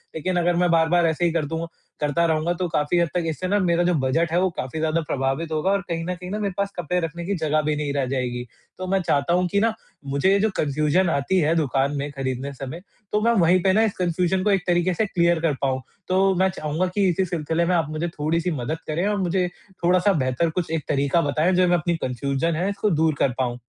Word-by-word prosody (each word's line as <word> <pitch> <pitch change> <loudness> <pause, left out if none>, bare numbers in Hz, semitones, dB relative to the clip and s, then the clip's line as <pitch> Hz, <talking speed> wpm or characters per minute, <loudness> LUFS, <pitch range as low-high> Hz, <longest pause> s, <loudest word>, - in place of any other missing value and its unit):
लेकिन 180 +4 -2
अगर 175 0 +2
मैं 180 0 +2
बार-बार 165 +1 +3
ऐसे 160 +2 0
ही 170 - +2
कर 165 -2 0
दूँ 165 +3 -4 0.3
करता 150 +3 +1
रहूँगा 160 +1 +1
तो 180 - 0
काफ़ी 160 0 0
हद 170 - +2
तक 180 - 0
इससे 160 +4 -3
ना 205 +2 +2
मेरा 175 -1 +2
जो 180 0 +2
बजट 155 +4 +1
है 175 - +2
वो 185 - +2
काफ़ी 130 +5 -4
ज़्यादा 160 +1 +1
प्रभावित 135 +4 -1
होगा 155 +4 0
और 200 0 +1
कहीं 165 -1 -2
न 180 0 -2
कहीं 180 +1 -9
ना 210 - -2
मेरे 200 -3 -2
पास 200 0 -1
कपड़े 175 +1 -1
रखने 170 +1 -4
की 200 +2 -1
जगह 155 -2 +1
भी 150 0 0
नहीं 145 -1 -2
रह 140 -2 0
जाएगी। 125 -2 -2 0.3
तो 185 0 -5
मैं 195 - +3
चाहता 145 -1 +1
हूँ 180 0 +2
कि 200 - +2
ना 225 +1 +2 0.3
मुझे 140 +7 +1
ये 200 - +4
जो 220 +2 +2
कन्फ़्यूज़न 155 +5 +1
आती 160 +6 +1
है 160 0 +2
दुकान 140 -2 +1
में 140 +1 -3
खरीदने 135 0 -4
समय 135 +6 -7 0.3
तो 210 - +1
मैं 235 +1 +3
वहीं 175 +2 +4
पे 190 - +4
ना 220 +3 +4
इस 215 - +1
कन्फ़्यूज़न 180 +1 0
को 210 - +2
एक 195 -2 +2
तरीक़े 175 +1 +2
से 215 - 0
क्लियर 170 -3 +2
कर 165 -3 +1
पाऊँ। 130 -1 0 0.3
तो 190 +1 +3
मैं 190 +1 +3
चाहूँगा 160 +2 -2
कि 200 -2 +3
इसी 185 +2 +1
सिलसिले 165 -1 -1
में 180 - +2
आप 165 -4 0
मुझे 155 +2 -2
थोड़ी-सी 165 +2 -1
मदद 155 +7 -2
करें 165 +5 -1
और 210 0 0
मुझे 180 0 +1 0.4
थोड़ा-सा 180 +3 +3
बेहतर 135 +2 0
कुछ 165 0 -3
एक 160 -2 -1
तरीक़ा 140 +3 +2
बताएँ 155 +4 +1
जो 180 0 +3
मैं 175 0 +3
अपनी 170 +2 -1
कन्फ़्यूज़न 140 +4 -1
है 180 +4 0
इसको 200 +1 -1
दूर 160 -2 +2
कर 135 - +2
पाऊँ। 120 -2 -1
170 Hz, 250 wpm, -23 LUFS, 150-180 Hz, 0.4 s, ये